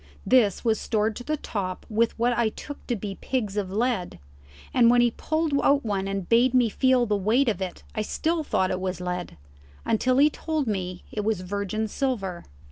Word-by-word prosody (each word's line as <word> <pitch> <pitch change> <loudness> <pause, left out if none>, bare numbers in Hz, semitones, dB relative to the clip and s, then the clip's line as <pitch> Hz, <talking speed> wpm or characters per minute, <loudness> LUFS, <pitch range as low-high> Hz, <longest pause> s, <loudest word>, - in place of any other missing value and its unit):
This 240 -5 +3
was 220 -1 +2
stored 220 -1 0
to 245 - -7
the 305 +4 -1
top 185 -8 -4
with 225 +1 +1
what 240 +1 +2
I 235 -2 +2
took 290 +6 -10
to 240 - 0
be 200 -2 -6
pigs 215 -7 -2
of 200 -3 -2
lead, 220 -3 -1 0.6
and 240 -2 +5
when 245 0 +5
he 240 -1 +4
pulled 315 +4 -1
out 280 -2 +3
one 195 -2 -1
and 195 -2 -3
bade 245 +2 +4
me 245 -3 +4
feel 255 +2 +3
the 210 -2 +1
weight 220 +7 +2
of 205 -5 0
it 185 -2 -5
I 215 - -1
still 320 +9 -1
thought 190 -9 0
it 185 - -1
was 185 -1 -3
lead, 180 - -4 0.5
until 255 +3 +2
he 295 +2 +5
told 310 -2 -2
me 185 -5 -3
it 210 - -3
was 215 -3 0
virgin 200 +3 -2
silver. 205 -8 -2
220 Hz, 205 wpm, -25 LUFS, 195-255 Hz, 0.6 s, and